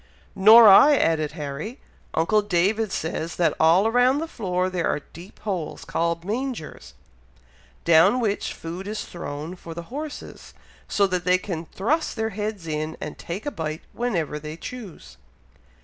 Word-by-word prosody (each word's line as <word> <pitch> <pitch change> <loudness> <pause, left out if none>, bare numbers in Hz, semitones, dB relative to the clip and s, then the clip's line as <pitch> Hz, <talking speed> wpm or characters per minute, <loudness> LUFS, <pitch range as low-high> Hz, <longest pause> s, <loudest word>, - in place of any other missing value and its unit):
"Nor 220 +4 +8
I!" 280 +9 +8
added 155 - +1
Harry. 155 - -6 0.4
"Uncle 200 +7 +3
David 205 +3 +1
says, 160 0 -3
that 170 - +2
all 175 +7 +4
round 250 +3 +3
the 325 - -3
floor 185 - -2
there 180 -2 -1
are 150 - -1
deep 170 +6 -14
holes, 185 -7 -4
called 170 0 -1
mangers, 235 - -5 0.9
down 170 +9 +5
which 210 -4 -1
food 175 +4 -7
is 215 +1 -4
thrown 160 0 -6
for 165 -2 -10
the 170 +7 -9
horses, 300 +1 -8 0.3
so 200 - +2
that 180 -2 -1
they 180 +1 +4
can 170 -3 -6
thrust 305 - -1
their 220 -1 -2
heads 210 -3 -4
in, 155 0 -3
to 150 - -5
take 175 +5 -7
a 290 - -2
bite, 155 - -5
whenever 170 -11 -2
they 155 +1 -8
choose." 180 - -9
180 Hz, 155 wpm, -24 LUFS, 165-220 Hz, 0.9 s, Nor